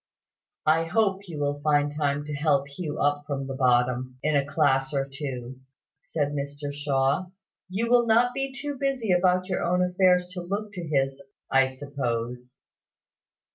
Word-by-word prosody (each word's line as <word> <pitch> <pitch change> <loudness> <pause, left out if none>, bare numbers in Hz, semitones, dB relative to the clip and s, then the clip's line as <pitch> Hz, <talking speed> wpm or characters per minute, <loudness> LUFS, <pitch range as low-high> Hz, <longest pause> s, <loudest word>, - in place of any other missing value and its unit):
"I 160 +1 +4
hope 195 +1 +1
you 165 -3 -7
will 145 0 -1
find 145 -1 +2
time 145 -1 0
to 150 - -5
help 145 -1 +1
Hugh 150 +1 -5
up 145 0 +1
from 140 -2 -2
the 135 - -5
bottom, 125 0 +1
in 155 0 +2
a 140 - +3
class 140 -1 +1
or 135 0 0
two," 130 -2 -6 0.4
said 145 -3 -1
Mr 145 0 -4
Shaw. 140 +4 +1 0.4
"You 210 +5 -1
will 240 0 +4
not 235 +2 +4
be 270 0 -2
too 275 0 -5
busy 270 -7 0
about 180 0 +3
your 190 - -1
own 180 +1 +2
affairs 180 0 +3
to 180 0 -6
look 200 +4 -4
to 175 -4 -6
his, 135 -2 0 0.3
I 135 0 +5
suppose." 125 -2 -4
145 Hz, 165 wpm, -26 LUFS, 135-180 Hz, 0.4 s, I